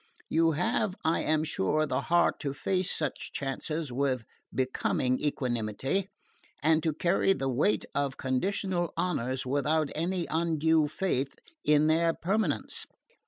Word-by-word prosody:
You 165 Hz, 0 st, +3 dB
have, 215 Hz, +3 st, 0 dB
I 160 Hz, -, +2 dB
am 155 Hz, 0 st, +1 dB
sure, 155 Hz, +2 st, +1 dB
the -, -, -1 dB
heart 175 Hz, 0 st, +2 dB
to 140 Hz, -2 st, -3 dB
face 185 Hz, +4 st, 0 dB
such 150 Hz, -3 st, -2 dB
chances 145 Hz, +2 st, -3 dB
with 130 Hz, -1 st, 0 dB, 0.3 s
becoming 130 Hz, 0 st, 0 dB
equanimity, 130 Hz, -, -1 dB, 0.5 s
and 160 Hz, +1 st, +4 dB
to 160 Hz, -, +1 dB
carry 175 Hz, +5 st, +2 dB
the 135 Hz, -7 st, -2 dB
weight 135 Hz, +11 st, +1 dB
of 140 Hz, -1 st, -1 dB
conditional 175 Hz, +6 st, -1 dB
honours 130 Hz, -8 st, -1 dB
without 145 Hz, +3 st, +1 dB
any 175 Hz, +2 st, -1 dB
undue 160 Hz, -1 st, +2 dB
faith 145 Hz, -4 st, -1 dB, 0.3 s
in 150 Hz, 0 st, +4 dB
their 165 Hz, +1 st, +3 dB
permanence." 205 Hz, +6 st, -1 dB
155 Hz, 130 wpm, -29 LUFS, 135-170 Hz, 0.5 s, and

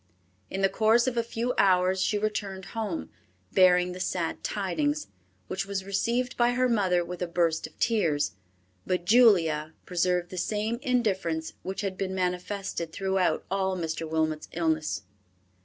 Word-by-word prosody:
In 195 Hz, -, -3 dB
the 195 Hz, -, +5 dB
course 220 Hz, +4 st, +3 dB
of 255 Hz, -2 st, -1 dB
a 235 Hz, -, +2 dB
few 235 Hz, +2 st, -2 dB
hours 185 Hz, -1 st, +4 dB
she 210 Hz, -, +1 dB
returned 205 Hz, -2 st, -3 dB
home, 210 Hz, -, -3 dB, 0.4 s
bearing 180 Hz, -1 st, +5 dB
the 180 Hz, -, -7 dB
sad 175 Hz, -2 st, -2 dB
tidings, 155 Hz, -, -1 dB, 0.4 s
which 190 Hz, +1 st, -3 dB
was 195 Hz, -1 st, -3 dB
received 235 Hz, +6 st, 0 dB
by 240 Hz, 0 st, +3 dB
her 255 Hz, +1 st, +2 dB
mother 185 Hz, -7 st, +2 dB
with 180 Hz, +1 st, -7 dB
a 180 Hz, -, 0 dB
burst 170 Hz, -2 st, 0 dB
of -, -, -22 dB
tears; 165 Hz, -, +1 dB, 0.5 s
but 180 Hz, -1 st, -1 dB
Julia 170 Hz, -9 st, +4 dB
preserved 180 Hz, 0 st, 0 dB
the 185 Hz, -, -4 dB
same 215 Hz, +5 st, -1 dB
indifference 195 Hz, -, 0 dB
which 190 Hz, +2 st, -4 dB
had 195 Hz, -2 st, -4 dB
been 190 Hz, -1 st, -2 dB
manifested 180 Hz, -1 st, -2 dB
throughout 190 Hz, 0 st, 0 dB
all 190 Hz, -1 st, 0 dB
Mr. 165 Hz, -1 st, -3 dB
Wilmot's 155 Hz, -1 st, -1 dB
illness. 160 Hz, -5 st, 0 dB
190 Hz, 155 wpm, -28 LUFS, 170-210 Hz, 0.5 s, the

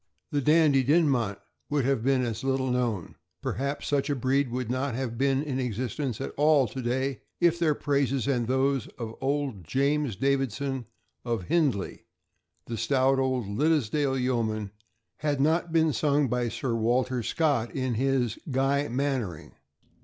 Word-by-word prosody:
The 145 Hz, -, +1 dB
Dandie 150 Hz, -2 st, +4 dB
Dinmont 130 Hz, -, +2 dB, 0.3 s
would 145 Hz, -3 st, +1 dB
have 135 Hz, -4 st, +1 dB
been 130 Hz, 0 st, +2 dB
as 115 Hz, 0 st, -4 dB
little 130 Hz, -1 st, 0 dB
known, 120 Hz, -8 st, -2 dB, 0.3 s
perhaps 140 Hz, +4 st, -2 dB
such 145 Hz, -1 st, 0 dB
a 145 Hz, -, +1 dB
breed 130 Hz, +1 st, +1 dB
would 125 Hz, 0 st, -3 dB
not 130 Hz, -1 st, -1 dB
have 125 Hz, -2 st, -3 dB
been 135 Hz, +2 st, +1 dB
in 135 Hz, -4 st, -2 dB
existence 125 Hz, +1 st, -3 dB
at 135 Hz, -, -4 dB
all 145 Hz, -3 st, +4 dB
to 130 Hz, -, -5 dB
day, 130 Hz, +2 st, -1 dB, 0.2 s
if 170 Hz, 0 st, +3 dB
their 155 Hz, -3 st, +2 dB
praises 140 Hz, -3 st, 0 dB
and 120 Hz, -4 st, +1 dB
those 130 Hz, -1 st, +1 dB
of 115 Hz, -2 st, -5 dB
old 135 Hz, -7 st, -1 dB
James 140 Hz, -, 0 dB
Davidson, 135 Hz, 0 st, -1 dB, 0.4 s
of 115 Hz, -5 st, -2 dB
Hindlee, 140 Hz, -, 0 dB, 0.6 s
the 115 Hz, -, -5 dB
stout 135 Hz, +2 st, +2 dB
old 130 Hz, -3 st, 0 dB
Liddesdale 140 Hz, +3 st, +1 dB
yeoman, 110 Hz, -5 st, -1 dB, 0.5 s
had 145 Hz, -2 st, -1 dB
not 160 Hz, +4 st, +2 dB
been 160 Hz, -2 st, +3 dB
sung 145 Hz, +4 st, +2 dB
by 120 Hz, 0 st, 0 dB
Sir 120 Hz, +2 st, -3 dB
Walter 120 Hz, +2 st, +1 dB
Scott 120 Hz, -1 st, +1 dB
in 130 Hz, -2 st, -1 dB
his 130 Hz, 0 st, 0 dB
"Gruy 140 Hz, +2 st, +1 dB
Mannering." 125 Hz, -, -2 dB
135 Hz, 155 wpm, -27 LUFS, 120-140 Hz, 0.6 s, Dandie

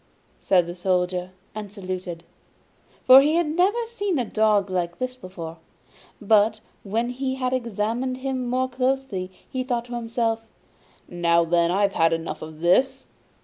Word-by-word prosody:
said 180 Hz, -3 st, +3 dB
the 175 Hz, -, -6 dB
Soldier 180 Hz, 0 st, -1 dB, 0.2 s
and 210 Hz, -2 st, -7 dB
saluted, 185 Hz, -4 st, -6 dB, 0.8 s
for 260 Hz, +1 st, +9 dB
he 300 Hz, +3 st, +2 dB
had 340 Hz, 0 st, +3 dB
never 380 Hz, +9 st, +1 dB
seen 410 Hz, -6 st, -2 dB
a 250 Hz, -, 0 dB
dog 215 Hz, -2 st, +2 dB
like 175 Hz, -2 st, -2 dB
this 255 Hz, 0 st, -3 dB
before. 175 Hz, -8 st, -8 dB, 0.6 s
But 215 Hz, 0 st, +3 dB, 0.2 s
when 230 Hz, +4 st, -1 dB
he 260 Hz, +1 st, -2 dB
had 255 Hz, -1 st, -1 dB
examined 235 Hz, +1 st, -2 dB
him 260 Hz, -1 st, -3 dB
more 255 Hz, +1 st, +1 dB
closely, 255 Hz, -7 st, -2 dB, 0.2 s
he 260 Hz, -1 st, -3 dB
thought 240 Hz, -2 st, -2 dB
to 240 Hz, -, -9 dB
himself: 230 Hz, -1 st, -2 dB, 0.6 s
'Now 170 Hz, -1 st, +2 dB
then, 170 Hz, 0 st, +2 dB
I've 200 Hz, +2 st, +2 dB
had 165 Hz, -2 st, +3 dB
enough 165 Hz, 0 st, -4 dB
of 155 Hz, 0 st, -9 dB
this! 180 Hz, +10 st, +2 dB
220 Hz, 150 wpm, -24 LUFS, 180-255 Hz, 0.8 s, for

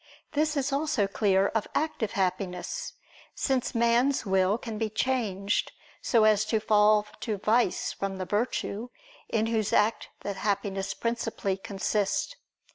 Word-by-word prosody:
This 305 Hz, 0 st, +1 dB
is 275 Hz, 0 st, 0 dB
also 285 Hz, -7 st, +1 dB
clear 195 Hz, -1 st, +2 dB
of 225 Hz, -2 st, -1 dB
active 295 Hz, -8 st, -1 dB
happiness: 190 Hz, -, -2 dB, 0.4 s
since 265 Hz, -4 st, 0 dB
man's 235 Hz, +3 st, +3 dB
will 190 Hz, +1 st, +2 dB
can 225 Hz, -3 st, -6 dB
be 220 Hz, -1 st, 0 dB
changed 210 Hz, -4 st, 0 dB, 0.3 s
so 230 Hz, -3 st, +3 dB
as 215 Hz, -1 st, +5 dB
to 215 Hz, 0 st, +1 dB
fall 210 Hz, 0 st, +4 dB
to 215 Hz, -3 st, -2 dB
vice 215 Hz, +1 st, +1 dB
from 195 Hz, -1 st, -4 dB
the 185 Hz, -, -3 dB
virtue, 215 Hz, +2 st, -2 dB, 0.4 s
in 220 Hz, -1 st, +1 dB
whose 220 Hz, -2 st, 0 dB
act 215 Hz, +2 st, +2 dB
that 200 Hz, -1 st, -4 dB
happiness 195 Hz, -1 st, -1 dB
principally 230 Hz, -4 st, -2 dB
consists. 205 Hz, -, -1 dB
215 Hz, 135 wpm, -28 LUFS, 195-235 Hz, 0.4 s, as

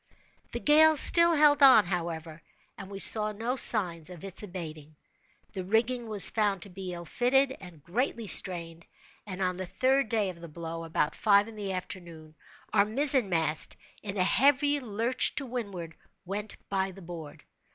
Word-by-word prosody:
The -, -, -5 dB
gale 310 Hz, +1 st, +4 dB
still 340 Hz, +4 st, +6 dB
held 295 Hz, -1 st, +3 dB
on, 260 Hz, -7 st, +6 dB
however, 165 Hz, -3 st, -6 dB, 0.3 s
and 195 Hz, -1 st, -11 dB
we 200 Hz, -, -9 dB
saw 215 Hz, +2 st, +4 dB
no 230 Hz, +5 st, -4 dB
signs 180 Hz, -10 st, +1 dB
of 175 Hz, -3 st, -12 dB
its 195 Hz, -2 st, -5 dB
abating. 160 Hz, -6 st, -9 dB, 0.6 s
The 190 Hz, -, -6 dB
rigging 230 Hz, +4 st, -2 dB
was 210 Hz, -3 st, +7 dB
found 205 Hz, -3 st, -1 dB
to 200 Hz, -, -9 dB
be 185 Hz, 0 st, -8 dB
ill 170 Hz, -1 st, -9 dB
fitted, 265 Hz, -, 0 dB
and 175 Hz, -6 st, -14 dB
greatly 230 Hz, +4 st, -3 dB
strained; 170 Hz, -4 st, +2 dB, 0.4 s
and 190 Hz, -1 st, -5 dB
on 180 Hz, -1 st, -2 dB
the 185 Hz, -1 st, -6 dB
third 265 Hz, +3 st, 0 dB
day 210 Hz, -4 st, -1 dB
of 170 Hz, -2 st, -17 dB
the 170 Hz, -, -10 dB
blow, 165 Hz, +1 st, -8 dB
about 160 Hz, -2 st, -2 dB
five 205 Hz, -1 st, +2 dB
in 225 Hz, -, -12 dB
the 205 Hz, -2 st, -6 dB
afternoon, 170 Hz, -5 st, -9 dB, 0.4 s
our 200 Hz, -2 st, +4 dB
mizzen 255 Hz, +1 st, +3 dB
mast, 160 Hz, -3 st, 0 dB, 0.3 s
in 200 Hz, -1 st, -7 dB
a 185 Hz, -, +1 dB
heavy 285 Hz, +8 st, +2 dB
lurch 235 Hz, +1 st, -1 dB
to 280 Hz, -, -4 dB
windward, 200 Hz, -10 st, -7 dB, 0.3 s
went 205 Hz, +3 st, -6 dB
by 195 Hz, -1 st, -2 dB
the 190 Hz, 0 st, -14 dB
board. 165 Hz, -3 st, -11 dB
195 Hz, 170 wpm, -27 LUFS, 170-235 Hz, 0.6 s, was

